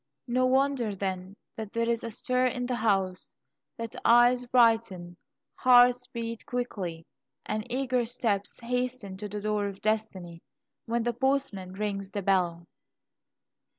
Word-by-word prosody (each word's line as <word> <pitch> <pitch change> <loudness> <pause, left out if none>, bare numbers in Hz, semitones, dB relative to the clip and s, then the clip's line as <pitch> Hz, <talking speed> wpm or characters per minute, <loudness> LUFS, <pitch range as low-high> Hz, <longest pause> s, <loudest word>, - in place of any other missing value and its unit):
No 255 +1 +2
wonder, 260 -5 +1
then, 190 0 -4 0.2
that 220 -1 -7
there 230 0 0
is 235 0 0
a 230 - -3
stir 255 +3 0
in 250 0 -2
the 250 - -2
house, 195 -5 0 0.4
that 230 -1 -6
eyes 245 +1 +5
brighten, 225 -8 +2 0.4
hearts 245 0 +5
beat 230 -2 -5
quickly, 190 -10 -4 0.4
and 215 +3 -4
eager 255 -1 +1
steps 220 -4 -1
hasten 245 -4 -3
to 210 +1 -6
the 210 +1 -5
door 210 -1 0
of 195 -1 -7
destiny, 195 -6 -2 0.5
when 235 0 0
the 240 +1 0
postman 255 -7 -1
rings 195 -1 -3
the 200 0 -4
bell! 175 -3 +1
225 Hz, 140 wpm, -28 LUFS, 195-245 Hz, 0.5 s, eyes